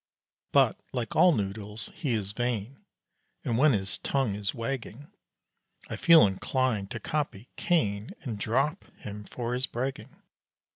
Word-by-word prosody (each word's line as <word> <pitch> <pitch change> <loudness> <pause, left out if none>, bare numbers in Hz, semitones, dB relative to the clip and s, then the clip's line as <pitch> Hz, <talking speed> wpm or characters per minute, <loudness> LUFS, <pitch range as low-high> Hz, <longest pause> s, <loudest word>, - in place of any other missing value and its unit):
But, - - +4
like 120 -4 -3
all 180 +2 +7
noodles, 105 -2 -3
he 145 -9 -2
is 100 -3 -2
vain; 120 +2 -3 0.6
And 115 - 0
when 140 +4 +5
his 100 -2 -2
tongue 135 -7 0
is 100 -1 -1
wagging, 130 +2 -5 0.8
I - - -1
feel 165 -2 +7
inclined 105 +1 0
to 110 - -5
copy 130 -4 -3
Cain, 110 - 0
And 115 -7 -4
"drop" 135 - 0 0.2
him 105 0 -7
for 120 +2 -4
his 125 +1 0
bragging. 130 +3 -5
120 Hz, 140 wpm, -28 LUFS, 105-135 Hz, 0.8 s, all